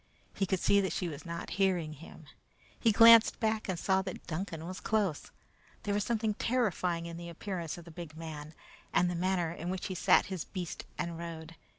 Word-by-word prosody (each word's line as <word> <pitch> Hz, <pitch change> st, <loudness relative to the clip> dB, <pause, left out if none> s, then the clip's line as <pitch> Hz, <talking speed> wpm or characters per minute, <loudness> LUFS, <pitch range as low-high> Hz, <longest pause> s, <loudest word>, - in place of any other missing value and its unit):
He 195 Hz, -, -1 dB
could 190 Hz, 0 st, +1 dB
see 200 Hz, +3 st, +4 dB
that 190 Hz, -, -1 dB
she 180 Hz, -, -1 dB
was 155 Hz, +1 st, -7 dB
not 170 Hz, 0 st, -5 dB
hearing 175 Hz, -5 st, +2 dB
him. 160 Hz, +1 st, -12 dB, 0.5 s
He 230 Hz, -, +4 dB
glanced 230 Hz, +1 st, +8 dB
back 220 Hz, -2 st, 0 dB
and 185 Hz, -, -1 dB
saw 190 Hz, +2 st, +2 dB
that 190 Hz, -1 st, -7 dB
Duncan 165 Hz, -1 st, -4 dB
was 185 Hz, +2 st, -6 dB
close. 205 Hz, -8 st, 0 dB, 0.5 s
There 205 Hz, -, -1 dB
was 205 Hz, 0 st, +1 dB
something 220 Hz, -1 st, 0 dB
terrifying 195 Hz, -8 st, 0 dB
in 170 Hz, 0 st, -6 dB
the 170 Hz, 0 st, -7 dB
appearance 170 Hz, -1 st, -4 dB
of 170 Hz, -, -11 dB
the 170 Hz, -, -11 dB
big 160 Hz, -2 st, -9 dB
man, 155 Hz, -1 st, -7 dB, 0.4 s
and 175 Hz, 0 st, +3 dB
the -, -, -2 dB
manner 175 Hz, -1 st, 0 dB
in 170 Hz, +1 st, -5 dB
which 185 Hz, 0 st, -3 dB
he 190 Hz, -, -3 dB
sat 180 Hz, -, +4 dB
his 190 Hz, -4 st, -4 dB
beast 180 Hz, -3 st, -6 dB
and 170 Hz, -1 st, -3 dB
rode. 165 Hz, -1 st, -7 dB
175 Hz, 205 wpm, -31 LUFS, 165-195 Hz, 0.5 s, glanced